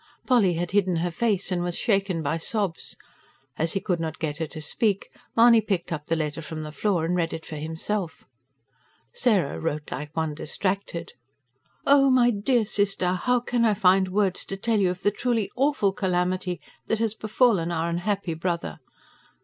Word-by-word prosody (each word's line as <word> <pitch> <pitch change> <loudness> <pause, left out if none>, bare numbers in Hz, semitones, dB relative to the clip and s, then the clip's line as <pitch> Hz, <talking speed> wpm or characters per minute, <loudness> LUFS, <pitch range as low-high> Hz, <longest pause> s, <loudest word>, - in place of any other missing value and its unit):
Polly 210 -9 +3
had 175 +1 -2
hidden 190 -3 +2
her 175 +1 -1
face, 200 +1 0
and 180 -1 0
was 175 0 -2
shaken 195 -7 0
by 150 +3 0
sobs 190 0 -2 0.6
As 160 +1 0
he 195 - 0
could 180 -3 -1
not 160 -1 -3
get 150 -2 -3
her 160 - -2
to 155 - -8
speak, 200 +5 -1 0.3
Mahony 230 -1 +7
picked 195 -5 -2
up 150 -2 -6
the 165 - +1
letter 155 0 -2
from 155 0 -6
the 150 - -6
floor 175 0 0
and 175 +2 0
read 170 -2 0
it 160 0 -6
for 155 - -7
himself. 160 +4 -3 0.9
Sarah 215 - +1
wrote 150 -2 -3
like 150 0 -6
one 160 -2 -1
distracted. 175 +2 -3 0.7
OH, 275 -1 +6
MY 245 -2 +5
DEAR 225 +2 +1
SISTER, 195 -3 0
HOW 245 +7 +1
CAN 240 -1 0
I 220 -2 +3
FIND 190 -1 +4
WORDS 190 -1 0
TO 195 - -5
TELL 220 +2 +1
YOU 190 -2 +3
OF 180 +1 -5
THE 205 - +3
TRULY 225 -2 -1
"AWFUL" 265 -7 +2
CALAMITY 180 -1 -1 0.3
THAT 225 - +1
HAS 220 -1 0
BEFALLEN 215 -6 +2
OUR 165 0 -1
UNHAPPY 180 0 -1
BROTHER. 165 - -3
185 Hz, 180 wpm, -25 LUFS, 165-210 Hz, 0.9 s, Mahony